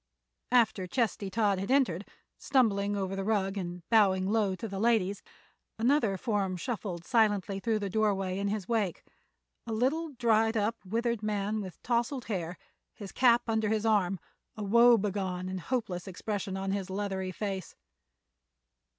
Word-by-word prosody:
After 220 -6 +3
Chesty 215 -3 -1
Todd 205 -1 +1
had 195 - -4
entered, 240 -9 +2 0.3
stumbling 205 -6 +2
over 195 -1 -2
the 195 - -2
rug 195 -2 0
and 175 -3 -5
bowing 195 -4 +4
low 205 -2 +1
to 225 - -6
the 195 -2 -5
ladies, 205 -3 +2 0.6
another 230 -4 +2
form 195 -4 -1
shuffled 185 -5 -4
silently 205 -4 +2
through 225 +1 0
the 205 -1 -3
doorway 195 -3 0
in 200 - -1
his 200 -2 -2
wake—a 225 +1 -5
little, 275 +9 0
dried 225 -2 +2
up, 215 +2 +1
withered 230 +3 -1
man 210 0 -1
with 185 -3 -8
tousled 240 +2 0
hair, 180 -5 -3 0.4
his 200 -3 -8
cap 240 -2 +4
under 220 -2 +1
his 220 0 0
arm, 195 -4 +2 0.4
a 215 - -4
woebegone 200 -5 +3
and 185 0 -4
hopeless 195 -4 -3
expression 195 +1 -4
on 195 0 -2
his 195 -1 -2
leathery 190 -1 -3
face. 195 -1 -4
205 Hz, 150 wpm, -30 LUFS, 190-225 Hz, 0.6 s, bowing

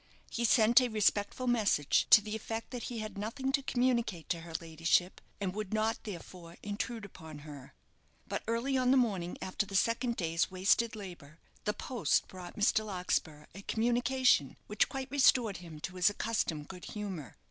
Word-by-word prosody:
He 235 - 0
sent 235 +2 +6
a 250 - +1
respectful 215 +2 +1
message, 215 - +2
to 210 - +9
the 215 +1 -5
effect 225 +2 -5
that 245 -2 -5
he 240 - -5
had 215 -2 -5
nothing 260 +6 -2
to 275 0 +1
communicate 240 - 0
to 170 - 0
her 165 -1 -10
ladyship, 165 +2 0 0.2
and 190 -3 -2
would 215 0 -3
not 220 +1 0
therefore 175 -3 -9
intrude 210 +2 -4
upon 160 -6 -11
her. 140 - -11 0.5
But - - -3
early 235 +4 0
on 250 -1 +2
the 265 - +5
morning 195 -8 0
after 190 +3 -1
the 195 - -6
second 235 +4 +1
day's 165 -3 0
wasted 195 +5 +2
labour, 175 -7 -10 0.3
the 210 - +1
post 240 0 0
brought 180 -2 -10
Mr. 215 +1 +3
Larkspur 180 -6 -2
a 200 - -9
communication 240 - +2
which 210 0 +1
quite 270 0 -5
restored 250 -6 +4
him 165 -4 -10
to 185 +2 -6
his 180 +1 +5
accustomed 205 -8 -2
good 180 -2 -9
humour. 190 - -6
210 Hz, 175 wpm, -32 LUFS, 175-235 Hz, 0.5 s, to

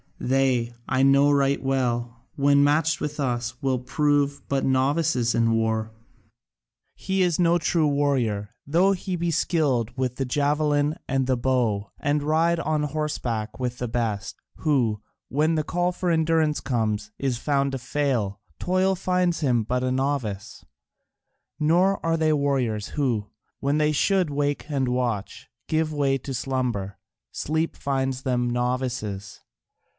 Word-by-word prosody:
They, 130 -2 +1
I 130 0 +1
know 140 +1 +5
right 140 -1 +2
well, 120 -3 -1
when 140 0 +4
matched 155 +2 +2
with 150 0 -4
us, 120 -3 -2
will 130 -2 0
prove 145 +2 +1
but 135 -1 0
novices 130 -2 +1
in 115 0 +3
war. 110 -1 0 1.0
He 190 0 -1
is 175 -2 +1
no 170 0 +4
true 165 -2 +1
warrior, 130 -8 0 0.2
though 175 +7 +3
he 185 0 -3
be 170 0 -1
skilled 140 - 0
with 130 -1 -1
the 135 - -2
javelin 145 +2 +1
and 135 -1 +1
the 130 -1 +1
bow 120 -6 0
and 145 0 0
ride 165 +3 +2
on 155 -2 0
horseback 130 -8 -3
with 125 -1 -2
the 125 - -3
best, 110 -3 -2 0.2
who, 120 -9 +1 0.3
when 155 +5 +1
the 155 - 0
call 175 +3 0
for 180 0 -2
endurance 160 -2 +2
comes, 110 -4 -1
is 135 -3 -1
found 140 0 +1
to 135 - -3
fail: 125 -7 -1 0.2
toil 185 +1 +1
finds 180 -1 0
him 125 -6 +2
but 125 +3 -1
a 130 - 0
novice. 125 -6 -2 1.0
Nor 175 +6 +2
are 165 0 +2
they 155 -1 +2
warriors 130 -7 0
who, 120 -8 -1 0.3
when 140 +2 0
they 150 0 +2
should 185 +3 +2
wake 145 0 -1
and 135 -3 0
watch, 120 -5 -2 0.2
give 155 0 0
way 140 -2 +1
to 135 +1 -6
slumber: 120 -7 -2 0.3
sleep 160 +2 -2
finds 135 -1 -2
them 125 -2 0
novices. 120 -5 -2
135 Hz, 145 wpm, -25 LUFS, 120-155 Hz, 1.0 s, know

